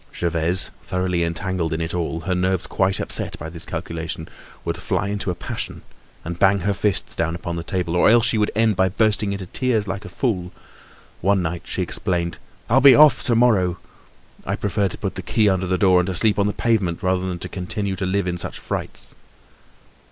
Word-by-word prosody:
Gervaise, 85 +1 0
thoroughly 90 0 -1
entangled 85 0 -2
in 80 - -2
it 80 0 -3
all, 85 -1 -2
her 90 +1 -1
nerves 95 0 0
quite 95 0 0
upset - - -3
by 80 - -6
this 85 0 -3
calculation, 85 -2 -4 0.4
would - - -1
fly 100 - -1
into 100 -1 -2
a 90 - -1
passion - - -5 0.4
and 85 +1 -5
bang 95 0 +4
her 100 +3 +1
fists 100 -1 -1
down 80 0 -1
upon 85 0 -4
the 85 - -3
table 90 -1 -2
or 90 - +5
else 115 0 +5
she 115 -2 +2
would 105 - +2
end 110 -1 +3
by 95 +1 +3
bursting 105 +1 +1
into 100 -1 -4
tears 110 +1 0
like 95 +1 -4
a - - -8
fool. 90 -9 -2 0.7
One 95 0 +2
night 85 +1 -3
she - - -2
exclaimed: 85 -2 -2 0.3
"I'll 130 +4 +4
be 135 -2 +9
off 150 -1 +7
to 120 - +3
morrow! 100 -7 +3 0.7
I - - -2
prefer 100 0 0
to - - -6
put - - -3
the - - -5
key 110 -2 +2
under 95 -1 +1
the 95 0 +1
door 90 -1 +5
and 90 - 0
to 95 - -2
sleep 105 +1 +2
on 100 - +3
the 105 - -1
pavement 100 -8 0
rather 95 0 +1
than 90 - -3
continue 95 +3 -3
to 95 - -2
live 100 0 0
in 90 -1 -2
such - - -4
frights." - - -5
95 Hz, 210 wpm, -22 LUFS, 85-100 Hz, 0.7 s, be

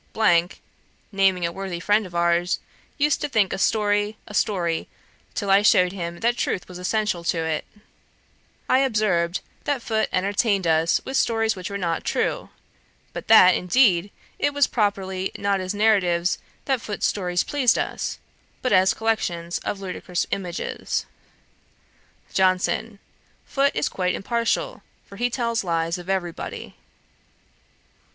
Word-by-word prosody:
(naming 190 -3 +2
a 170 - -1
worthy 190 -1 -5
friend 205 +2 +2
of 175 - -13
ours,) 170 +1 +1 0.4
used 295 -1 +2
to - - -2
think 215 -7 +2
a - - -3
story, 205 +1 +1
a 210 - -11
story, 175 -6 0 0.5
till 200 -3 -1
I 195 +1 +6
shewed 180 -3 +4
him 170 -2 -6
that 240 +2 +1
truth 185 - -2
was 180 -1 -9
essential 190 -1 -1
to 165 -1 0
it.' 160 -1 -2 1.0
I 260 - +4
observed, 210 -9 +1 0.2
that 280 -5 -1
Foote 220 -1 0
entertained 200 +1 +1
us 160 0 +2
with 265 - -2
stories 225 -1 +1
which 185 -2 -6
were 200 - -3
not 170 -4 -2
true; - - -1 0.6
but - - -7
that, 185 -5 +8
indeed, 185 -1 +3 0.3
it 285 0 0
was 285 -1 +5
properly 190 -4 -1
not 200 -1 0
as 185 0 -3
narratives 195 -5 +2 0.3
that 265 -3 0
Foote's 210 -3 -3
stories 180 -3 0
pleased 275 -5 +2
us, - - -3 0.5
but 255 - +1
as 190 0 +4
collections 175 -7 -1
of 200 - -4
ludicrous 180 -1 -3
images. 180 -3 -3 1.3
JOHNSON. 190 +3 +1 0.5
'Foote 275 0 +1
is - - +1
quite 180 -1 -1
impartial, 230 +3 -1 0.2
for 200 - -13
he 245 +3 +1
tells 230 -2 -1
lies 165 0 -1
of 175 +1 -10
every 185 -3 0
body.' - - -8
195 Hz, 145 wpm, -23 LUFS, 180-220 Hz, 1.3 s, that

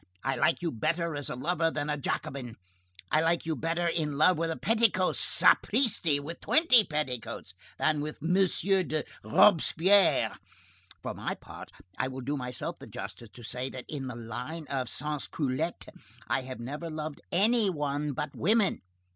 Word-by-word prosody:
I 135 0 0
like 155 +7 +2
you 170 - 0
better 165 +6 -1
as 145 -1 -3
a - - -3
lover 165 +5 +1
than 145 -2 -3
as 150 -1 -1
a - - -11
Jacobin. 125 -3 -3 0.6
I 155 - +4
like 165 +1 +1
you 160 -1 -1
better 165 +2 -1
in 155 -4 0
love 180 +5 +5
with 165 +1 -1
a 165 - -2
petticoat, 220 -5 +2
sapristi! 180 - +3
with 155 +4 -7
twenty 280 -8 +5
petticoats, 150 - -4 0.2
than 155 -1 +1
with 150 +1 -5
M. 165 +4 0 0.5
de 155 -1 -1 0.2
Robespierre. 180 - +4 0.7
For - - -3
my - - -3
part, - - -11 0.3
I - - +1
will 130 0 -6
do 140 +4 -2
myself 125 -2 -5
the - - -10
justice 115 - -8
to 120 +3 -13
say, 125 +2 -3
that 130 -2 -8
in 140 -3 -5
the 125 - -5
line 125 +8 -6
of 130 -3 -1
sans 150 0 -3
culottes, 150 +3 -2 0.4
I - - +1
have 130 -1 -7
never 145 +8 -5
loved 155 -1 -5
any 215 +3 +3
one 145 -3 -2
but 150 0 -4
women. 210 +3 +2
150 Hz, 170 wpm, -29 LUFS, 135-170 Hz, 0.7 s, love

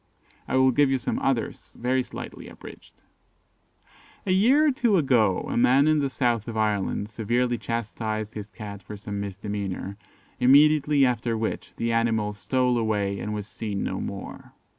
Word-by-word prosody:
I - - -1
will 130 0 +5
give 140 +2 +3
you 135 - +2
some 125 - -2
others 135 -4 -2
very 130 +2 +1
slightly - - -8
abridged. - - -13 1.3
"A 185 - 0
year 250 +11 +5
or 300 - +4
two 235 -6 +2
ago, 120 - +3
a - - -4
man 130 +4 +4
in 155 -1 +4
the 140 -1 0
south 120 -4 0
of 115 -1 -5
Ireland 105 -1 0
severely 120 +2 -1
chastised 110 -2 -3
his 105 -1 -7
cat 100 -3 -8
for 105 - -9
some 100 0 -5
misdemeanour, 100 -1 -4 0.4
immediately 145 +2 +5
after 120 -2 0
which 110 0 -4
the 115 0 -1
animal 115 -2 +1
stole 125 +3 0
away, 100 -3 -1
and 105 - -4
was 105 -2 -4
seen 105 -2 -4
no - - -3
more. - - -7
115 Hz, 160 wpm, -25 LUFS, 105-130 Hz, 1.3 s, will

